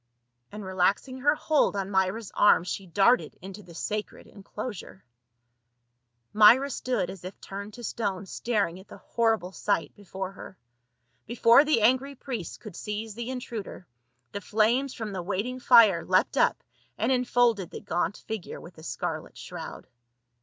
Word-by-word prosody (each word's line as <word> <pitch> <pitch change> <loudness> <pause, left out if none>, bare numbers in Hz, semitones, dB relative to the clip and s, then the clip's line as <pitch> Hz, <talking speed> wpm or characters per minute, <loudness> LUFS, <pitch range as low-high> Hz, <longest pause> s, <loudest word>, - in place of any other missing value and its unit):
And 210 -1 -8
relaxing 190 +8 0
her 290 +3 +3
hold 305 -7 +1
on 195 0 -3
Myra's 190 +3 0
arm 205 -5 +5
she 185 +1 -5
darted 205 +8 +2
into 195 +2 -9
the 170 -3 -14
sacred 210 +5 -4
enclosure. 205 -1 -8 1.3
Myra 235 +7 +6
stood 220 -9 -2
as 190 -2 -11
if 185 +2 -8
turned 200 +2 -8
to 240 - -10
stone 200 -5 -3
staring 200 -4 -1
at 190 - -15
the - - -12
hor 225 -1 +1
rible 180 0 -10
sight 205 +1 -1
before 190 -1 -6
her. 190 -1 -11 0.7
Before 235 +3 +6
the 300 -6 +2
angry 260 +4 +2
priests 240 - -6
could 210 -6 -11
seize 210 +1 -5
the 235 +3 -6
intruder, 235 -7 -6 0.5
the 200 - -5
flames 235 +7 +1
from 220 -2 -5
the 185 - -3
waiting 205 +8 -3
fire 225 -9 +6
leapt 185 0 +2
up - - +2 0.3
and - - +1
enfolded 245 -6 +2
the - - -8
gaunt 175 +2 -2
figure 220 -4 -5
with 170 -1 -13
a - - -13
scarlet 125 -5 -5
shroud. - - -8
210 Hz, 155 wpm, -27 LUFS, 190-240 Hz, 1.3 s, Myra